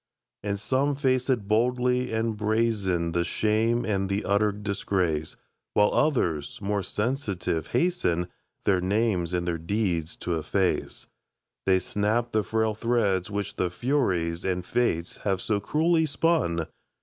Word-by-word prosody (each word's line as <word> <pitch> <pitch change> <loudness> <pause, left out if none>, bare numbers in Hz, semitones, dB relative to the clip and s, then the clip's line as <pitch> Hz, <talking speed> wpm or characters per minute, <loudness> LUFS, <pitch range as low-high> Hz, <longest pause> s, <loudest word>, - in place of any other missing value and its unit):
And 100 -1 -2
some 135 +6 +1
face 130 -2 +1
it 115 -6 +1
boldly, 125 +3 +1
and 110 0 0
brazen 105 -5 0
The 85 +1 +1
shame 110 +5 +1
and 95 -2 0
the 100 +1 -1
utter 105 +1 +3
disgrace; 95 -6 -1 0.4
While 105 0 +4
others, 115 - +1
more 100 0 -1
sensitive, 100 - -2
hasten 90 - +1 0.4
Their 95 -2 +3
names 95 -3 +1
and 90 -1 -1
their 85 -1 -1
deeds 85 -2 -1
to 85 -2 -1
efface. 90 +4 -1 0.6
They 95 -1 +5
snap 110 +5 0
the 110 - +2
frail 110 +2 0
thread 105 -5 +1
which 100 -1 -4
the 90 - +1
Furies 90 - 0
And 90 -1 -1
Fates 90 -7 0
have 95 -2 -1
so 105 +1 0
cruelly 160 +6 +2
spun. 140 - +1
105 Hz, 135 wpm, -26 LUFS, 90-120 Hz, 0.6 s, They